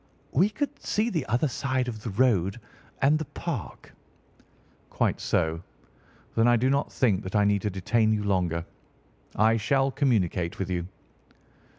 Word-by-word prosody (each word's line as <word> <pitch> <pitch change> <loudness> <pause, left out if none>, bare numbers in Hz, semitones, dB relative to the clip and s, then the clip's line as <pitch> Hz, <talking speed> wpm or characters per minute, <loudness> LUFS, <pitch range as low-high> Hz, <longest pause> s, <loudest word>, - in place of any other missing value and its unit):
"We 180 +9 +3
could 280 +7 -4
see 225 +3 0
the 160 -7 -2
other 120 +7 +1
side 130 -1 -1
of 110 -3 -5
the 115 - -4
road 105 -2 +1 0.4
and 150 +3 +4
the 155 - -3
Park." 140 - -6 1.0
"Quite - - 0
so. 80 +1 0 0.7
Then 115 +1 +4
I 120 - +5
do 130 +4 +2
not 140 +1 0
think 105 -7 +1
that 95 -1 -6
I 105 -1 +4
need 100 -1 +2
to 105 - -1
detain 110 +3 +1
you 105 -1 0
longer. 90 -4 0 0.7
I 110 +2 +4
shall 135 +5 +1
communicate 100 - 0
with 95 -1 -3
you." 90 -1 -2
110 Hz, 160 wpm, -27 LUFS, 95-135 Hz, 1.0 s, I